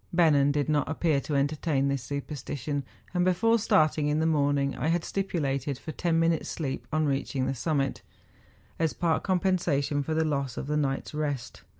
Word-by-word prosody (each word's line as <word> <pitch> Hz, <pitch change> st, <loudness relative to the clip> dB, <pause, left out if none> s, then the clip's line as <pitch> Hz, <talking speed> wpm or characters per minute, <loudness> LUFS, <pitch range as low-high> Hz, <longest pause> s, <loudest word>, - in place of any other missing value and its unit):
Bennen 150 Hz, -5 st, +4 dB
did 145 Hz, 0 st, 0 dB
not 150 Hz, -2 st, +1 dB
appear 160 Hz, -3 st, +1 dB
to 150 Hz, -, -3 dB
entertain 145 Hz, 0 st, +1 dB
this 140 Hz, -1 st, 0 dB
superstition, 140 Hz, +2 st, -4 dB, 0.3 s
and 180 Hz, -1 st, +2 dB
before 225 Hz, +6 st, +3 dB
starting 155 Hz, -7 st, +3 dB
in 150 Hz, +1 st, +1 dB
the 160 Hz, -, +1 dB
morning 145 Hz, -3 st, +2 dB
I -, -, -2 dB
had 165 Hz, +1 st, +1 dB
stipulated 145 Hz, -8 st, -2 dB
for 155 Hz, -, -7 dB
ten 165 Hz, 0 st, 0 dB
minutes' 165 Hz, -1 st, +1 dB
sleep 135 Hz, -5 st, -4 dB
on 155 Hz, 0 st, +1 dB
reaching 135 Hz, -2 st, -1 dB
the 135 Hz, -, 0 dB
summit, 135 Hz, 0 st, -1 dB, 0.8 s
as 160 Hz, -2 st, +1 dB
part 165 Hz, -2 st, +1 dB
compensation 175 Hz, -7 st, +1 dB
for 155 Hz, +3 st, -2 dB
the 160 Hz, 0 st, +2 dB
loss 140 Hz, -5 st, -2 dB
of -, -, -3 dB
the 150 Hz, +2 st, -1 dB
night's 140 Hz, -2 st, -1 dB
rest. 145 Hz, -4 st, -3 dB
150 Hz, 180 wpm, -28 LUFS, 140-165 Hz, 0.8 s, Bennen